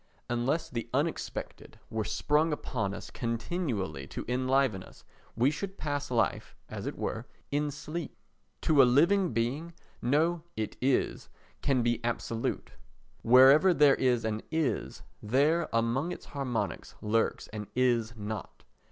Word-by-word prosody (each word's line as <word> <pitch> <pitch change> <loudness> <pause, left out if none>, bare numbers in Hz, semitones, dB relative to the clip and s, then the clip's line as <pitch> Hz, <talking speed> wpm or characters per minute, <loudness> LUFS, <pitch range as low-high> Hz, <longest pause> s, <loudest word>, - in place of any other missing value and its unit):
Unless 125 +7 0
the 115 -2 -4
unexpected 155 +4 -3
were 110 -1 -1
sprung 150 +8 +1
upon 110 -9 -2
us - - -9
continually 115 - -3
to - - -6
enliven 130 -4 +1
us - - -15 0.3
we 125 +5 +3
should 195 +5 -5
pass 145 -1 -3
life, 120 -2 0
as - - -5
it - - -4
were, - - -3 0.2
in 145 +1 +1
sleep. 150 +3 -6 0.4
To 150 -3 +5
a - - +8
living 170 +9 +4
being 130 +9 -2 0.3
no 160 +7 +2 0.2
"It 110 -1 -3
is" 130 0 0 0.3
can 130 -4 +2
be 120 0 0
absolute; 115 -1 -2 0.5
wherever 135 +9 +7
there 145 -2 +6
is 125 -4 +1
an 110 0 -1
"Is," 160 -3 -1 0.2
there, 145 +10 +2
among 115 +8 +1
its - - -7
harmonics, 135 -5 -3
lurks 110 +1 0
an 105 -1 -6
"Is 120 -3 +2
not." 110 0 -6
130 Hz, 135 wpm, -30 LUFS, 115-150 Hz, 0.5 s, a